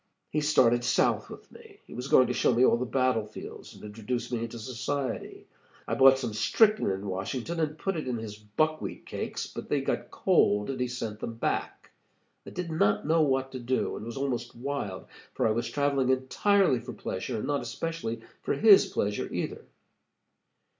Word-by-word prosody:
"He 150 - 0
started 120 -5 +4
south 120 - +2
with - - -12
me. - - -15
He - - -12
was 125 +2 -5
going 130 - +6
to 125 - -1
show 120 - +2
me 125 +2 +5
all 115 - +4
the 125 +1 -3
battle 125 -3 +1
fields, 105 - -10
and - - -14
introduce 115 +4 -4
me 120 - -1
into 115 +1 -5
society. 130 +4 -4 0.4
I - - -1
bought 135 0 +7
some 120 -5 -3
strychnine 215 - +3
in 95 +1 -3
Washington, 105 - -3
and 155 -1 -1
put 195 +4 -2
it 155 -5 -4
in 125 -2 -1
his 110 -2 -6
buckwheat 105 +10 -2
cakes; - - -4
but - - -8
they - - +1
got - - -2
cold, 105 +5 +2
and 130 - -5
he 125 - 0
sent 115 -4 -5
them 115 - -5
back. 115 - -3 0.6
I - - -5
did 180 -2 -5
not 105 -10 +2
know 160 +2 +3
what 135 -2 +1
to 130 - -6
do, 125 +2 -1
and - - -7
was 115 +2 -6
almost 135 -3 -2
wild, 120 -6 -4 0.3
for - - +1
I - - +2
was 120 +2 -1
traveling 140 -2 +1
entirely 130 - +3
for 120 +1 -8
pleasure, 110 +4 -4
and 105 - -3
not 145 -1 0
especially 120 -1 -4 0.2
for - - -1
his 210 -3 +7
pleasure 105 0 -2
either. - - -4
125 Hz, 195 wpm, -28 LUFS, 115-140 Hz, 0.6 s, bought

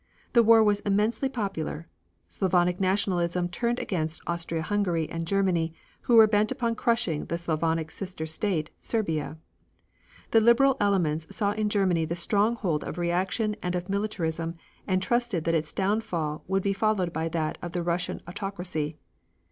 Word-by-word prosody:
The 235 - +7
war 225 0 +6
was 205 -1 +3
immensely 210 +6 +1
popular. 195 - -4 0.4
Slavonic 180 -1 +1
nationalism 180 -2 +1
turned 235 +7 -1
against 160 -7 -2
Austria 165 -1 -2
Hungary 180 -5 0
and 165 0 -5
Germany 175 -4 +1 0.3
who 240 - +2
were 225 -1 +10
bent 210 0 +2
upon 235 -3 0
crushing 230 -9 0
the 170 - -2
Slavonic 160 -1 -1
sister 180 -5 -5
state, 160 -1 -1
Serbia. 160 -9 -2 0.9
The 225 - +5
Liberal 245 +4 +5
elements 165 -6 +1
saw 205 -3 0
in 210 0 -1
Germany 185 -5 +2
the 165 +2 -3
stronghold 200 -3 +1
of - - -6
reaction 185 +5 0
and 180 0 -2
of 180 +2 -4
militarism, 170 -5 -2 0.3
and 185 -1 +1
trusted 240 -8 0
that 165 - 0
its 155 -2 0
downfall 180 -7 -1
would 195 0 0
be 200 - +1
followed 195 -4 0
by 160 +1 -1
that 160 -2 -2
of 175 0 -6
Russian 175 0 -1
autocracy. 175 -5 -4
185 Hz, 150 wpm, -27 LUFS, 165-210 Hz, 0.9 s, were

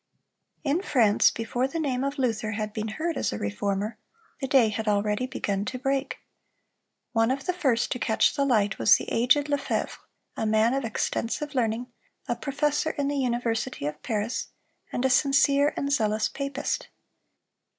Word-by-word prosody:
In 300 +4 +1
France, 230 - +4
before 240 +3 -2
the 330 +5 -4
name 265 -4 -1
of 275 +1 -2
Luther 225 -4 -1
had 215 0 -3
been 215 0 -3
heard 315 +8 -3
as - - 0
a 105 - -3
Reformer, 200 - -2 0.4
the 270 - -2
day 260 -4 +5
had 220 +1 -4
already 210 +4 +1
begun 200 -6 -2
to 255 +3 -4
break. 270 +1 -1 0.9
One 225 0 +2
of 270 +1 -2
the 360 - 0
first 265 -10 +1
to 250 - -1
catch 220 -1 +2
the 280 - +1
light 215 -7 +2
was 115 - +7
the - - -3
aged 250 +5 +3
Lefevre, 285 -2 -2 0.4
a 220 - -1
man 220 +3 +3
of 275 0 -1
extensive 235 +5 -2
learning, 235 -2 0 0.4
a 240 - 0
professor 295 +3 0
in 285 -1 0
the 285 - -1
University 240 - -1
of 150 +1 -4
Paris, 220 0 -2 0.4
and 250 - -1
a - - +4
sincere 280 +1 +4
and 280 - -1
zealous 215 -4 +1
papist. 275 0 -3
250 Hz, 170 wpm, -26 LUFS, 220-275 Hz, 0.9 s, was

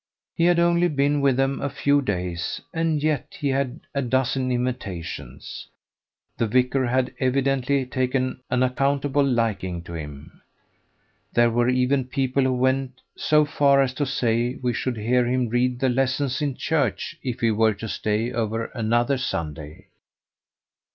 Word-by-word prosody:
He 170 - +1
had 175 0 +4
only 170 +1 +3
been 145 -2 +1
with 135 -2 +3
them 135 0 0
a 140 - -1
few 145 +1 +2
days, 90 -7 -3
and 160 -2 0
yet 155 -4 -1
he 145 - 0
had 135 +1 -1
a 140 - 0
dozen 130 0 0
invitations. 120 -9 -4 0.7
The 115 - +2
vicar 125 +3 +2
had 130 +1 0
evidently 135 0 +1
taken 130 0 -1
an 125 0 +2
unaccountable 140 +2 +1
liking 110 -9 -1
to 85 - -9
him. 75 -2 -9 0.9
There 120 0 +4
were 120 +1 +2
even 130 +1 +2
people 130 +1 0
who 130 -1 +2
went 130 0 0
so 150 0 +3
far 140 -2 +3
as 135 -2 +2
to 145 +1 -1
say 120 -1 0
we 125 -1 +1
should 120 0 -2
hear 120 +3 +2
him 125 -1 0
read 125 +1 +1
the 135 0 +2
lessons 130 +2 0
in 145 -3 -1
church 145 -8 -1
if 125 -3 -4
he 115 -1 +3
were 110 0 +2
to 110 +3 -6
stay 110 +2 -1
over 115 0 -2
another 120 +3 +1
Sunday. 75 - -5
130 Hz, 155 wpm, -24 LUFS, 120-140 Hz, 0.9 s, had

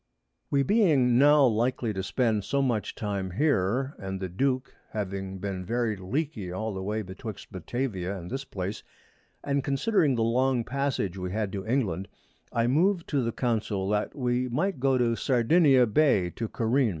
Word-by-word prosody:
We 140 -1 +2
being 140 - +3
now 145 0 +6
likely 120 0 +1
to 95 - -3
spend 110 +1 0
so 140 +5 0
much 120 -5 -1
Time 100 -3 -3
here, 130 - +1
and 95 -1 -5
the 95 -1 -4
Duke 130 +7 -1 0.2
having 95 -2 -4
been 95 -1 -4
very 115 +2 -1
leaky 105 - -3
all 110 +4 -3
the 95 - -4
way 105 +3 -2
betwixt 95 +2 -8
Batavia 95 -1 -3
and 90 -1 -8
this 135 +2 -3
Place, 100 -4 -5 0.6
and 140 -1 0
considering 145 - +2
the 115 - +1
long 125 +1 +2
Passage 130 -8 -2
we 90 0 -4
had 105 -1 -2
to 100 +2 -5
England, 100 -7 0 0.4
I 115 0 +1
moved 170 +8 +2
to 140 -3 +1
the 115 - -1
Council 110 -5 -1
that 105 0 -1
we 125 -1 0
might 155 +6 -1
go 135 0 +2
to 120 -2 +2
Sardinia 130 +2 +4
Bay 105 - +2
to 115 - -4
careen. 120 +2 +1
115 Hz, 170 wpm, -27 LUFS, 100-135 Hz, 0.6 s, now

